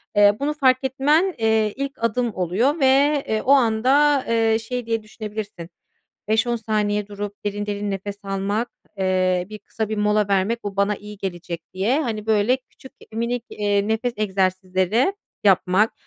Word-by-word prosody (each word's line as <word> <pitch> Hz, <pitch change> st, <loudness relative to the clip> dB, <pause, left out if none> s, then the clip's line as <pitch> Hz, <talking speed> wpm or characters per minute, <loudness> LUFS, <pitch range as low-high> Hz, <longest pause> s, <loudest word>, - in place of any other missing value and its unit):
Eee, 205 Hz, 0 st, +5 dB
bunu 290 Hz, +2 st, 0 dB
fark 260 Hz, -3 st, +3 dB
etmen, 295 Hz, +8 st, +2 dB
eee, 220 Hz, -2 st, +2 dB
ilk 275 Hz, -2 st, -5 dB
adım 230 Hz, 0 st, 0 dB
oluyor 205 Hz, -, +1 dB
ve, 280 Hz, +1 st, +4 dB
eee, 220 Hz, 0 st, 0 dB
o 270 Hz, -, +1 dB
anda, 270 Hz, +3 st, +4 dB
eee, 225 Hz, -1 st, +2 dB
şey 245 Hz, +1 st, -4 dB
diye 225 Hz, -1 st, -1 dB
düşünebilirsin, 210 Hz, -5 st, -7 dB, 0.6 s
"5-10 225 Hz, +2 st, +2 dB
saniye 210 Hz, -2 st, -1 dB
durup 205 Hz, 0 st, -6 dB
derin 205 Hz, 0 st, -2 dB
derin 205 Hz, 0 st, -3 dB
nefes 200 Hz, +1 st, -5 dB
almak, 195 Hz, +4 st, -1 dB, 0.3 s
eee, 185 Hz, -1 st, +1 dB
bir 215 Hz, -, -7 dB
kısa 215 Hz, +1 st, -4 dB
bir 215 Hz, -, -3 dB
mola 210 Hz, 0 st, +2 dB
vermek, 200 Hz, +4 st, 0 dB
bu 200 Hz, -1 st, -5 dB
bana 200 Hz, +1 st, +1 dB
iyi 210 Hz, 0 st, -11 dB
gelecek." 175 Hz, -3 st, -5 dB
diye, 225 Hz, +10 st, +1 dB
hani, 220 Hz, -5 st, -4 dB
böyle 220 Hz, +3 st, +3 dB
küçük, 265 Hz, 0 st, -17 dB, 0.2 s
minik, 235 Hz, +1 st, -2 dB
eee, 205 Hz, 0 st, 0 dB
nefes 225 Hz, +2 st, 0 dB
egzersizleri 190 Hz, -, +1 dB, 0.3 s
yapmak 195 Hz, +2 st, +3 dB
215 Hz, 155 wpm, -22 LUFS, 200-245 Hz, 0.6 s, Eee